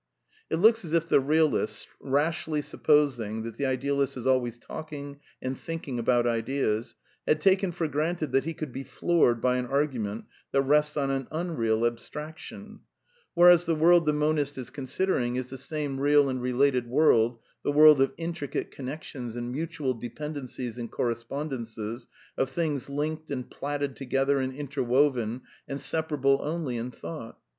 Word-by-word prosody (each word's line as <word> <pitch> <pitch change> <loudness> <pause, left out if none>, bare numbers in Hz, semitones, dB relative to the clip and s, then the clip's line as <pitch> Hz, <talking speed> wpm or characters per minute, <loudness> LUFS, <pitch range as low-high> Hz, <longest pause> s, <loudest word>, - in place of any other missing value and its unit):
It - - +1
looks 225 +5 +5
as 165 -2 -5
if 165 0 +2
the - - +5
realist, 155 +3 +1
rashly 150 +2 0
supposing 125 -10 +1
that 115 -1 -7
the 140 - 0
ideal 140 +2 0
ist 135 -1 -1
is 120 - -6
always 125 -3 +1
talking 145 0 -8 0.2
and 130 +1 -2
thinking 160 -5 -5
about 120 0 +2
ideas, 115 -1 -1 0.3
had 155 - +3
taken 190 +2 +3
for 165 -1 -2
granted 155 +2 -1
that 135 +1 +2
he 165 0 -3
could 150 -5 -6
be 135 - -5
floored 135 -2 +2
by 125 +2 +2
an 125 -1 -2
argument 125 -7 -1 0.3
that 135 0 +3
rests 150 +2 +2
on 140 -1 +1
an 135 -1 -2
unreal 120 -10 0
abstraction; 160 - -6 0.6
whereas 175 0 +7
the 165 - +2
world 170 +1 +5
the - - +5
monist 150 -1 0
is 130 -2 -6
considering 130 -2 -1
is 125 0 -3
the 135 - -6
same 145 -4 -3
real 145 0 +4
and 130 -1 -2
related 125 0 +2
world, 120 -4 +4 0.3
the - - +1
world 150 -1 +7
of 135 0 +3
intricate 165 -4 -4
connections 130 -3 -6
and 120 0 -4
mutual 145 -2 -2
dependencies 125 -1 -6
and 115 -1 -5
correspondences, 115 -2 -4 0.3
of 135 - +1
things 150 -5 -2
linked 155 +2 -3
and 130 -3 -4
platted 145 -1 -3
together 135 +1 +1
and 130 0 -2
interwoven, 130 -3 +1 0.3
and 140 - -4
separable 140 -2 +1
only 150 -4 -2
in 120 +1 -3
thought. 125 -1 -8
140 Hz, 160 wpm, -27 LUFS, 125-155 Hz, 0.6 s, whereas